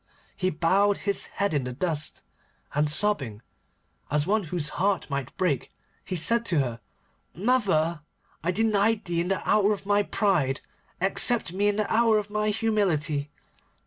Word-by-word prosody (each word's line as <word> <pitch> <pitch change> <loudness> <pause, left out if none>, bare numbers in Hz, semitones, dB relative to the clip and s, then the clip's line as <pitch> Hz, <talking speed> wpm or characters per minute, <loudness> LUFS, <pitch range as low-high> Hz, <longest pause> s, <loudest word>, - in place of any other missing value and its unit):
He 185 - 0
bowed 195 +5 +2
his 200 -1 -2
head 200 -3 -2
in 145 -3 0
the 125 - -4
dust, 155 +1 -2 0.5
and 150 +1 +1
sobbing, 145 - +1 0.7
as 150 +1 +1
one 205 +1 +1
whose 160 -2 -2
heart 195 -2 +1
might 140 -2 -4
break, 165 -10 -1 0.3
he 185 - -4
said 230 +8 +3
to 175 - +1
her: 120 -5 -1 0.6
'Mother, 180 -7 +1 0.4
I 170 - 0
denied 215 +1 +1
thee 170 -2 0
in 175 - -2
the 195 0 -2
hour 210 0 +4
of 195 - -7
my 205 0 +3
pride. 155 -11 0 0.4
Accept 195 +1 +1
me 200 +2 +1
in 205 - +2
the 215 0 -1
hour 225 -1 +4
of 210 -1 -3
my 210 0 0
humility. 180 -10 0
190 Hz, 160 wpm, -26 LUFS, 150-210 Hz, 0.7 s, hour